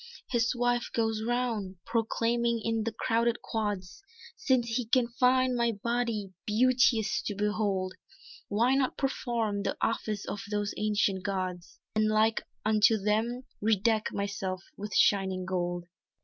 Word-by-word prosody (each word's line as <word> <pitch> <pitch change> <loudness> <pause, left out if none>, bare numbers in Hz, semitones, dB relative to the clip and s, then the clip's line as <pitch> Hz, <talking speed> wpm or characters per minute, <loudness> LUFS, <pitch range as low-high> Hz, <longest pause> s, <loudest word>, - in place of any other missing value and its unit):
His 235 0 +2
wife 245 0 +1
goes 225 -1 0
round 230 -5 -1
proclaiming 230 +1 +1
in 225 -1 0
the 230 - -1
crowded 230 +1 0
quads 205 - -3 0.3
"Since 260 - +1
he 230 +1 -1
can 235 0 +3
find 255 +1 +3
my 235 -1 +1
body 230 -2 -2 0.2
beauteous 240 0 +3
to 205 - -2
behold, 200 -2 0 0.5
Why 235 +5 +2
not 270 -1 +1
perform 235 -6 -1
the - - -2
office 215 -2 -1
of 205 - -4
those 205 -1 -1
ancient 205 -2 +1
gods 185 -3 -4 0.2
And 215 0 +3
like 215 +1 +3 0.2
unto 220 +1 +4
them, 220 +5 0 0.2
redeck 215 +1 +2
myself 195 -2 -3
with 210 +1 -6
shining 190 -2 +3
gold?" 175 -1 -2
220 Hz, 135 wpm, -29 LUFS, 205-235 Hz, 0.5 s, unto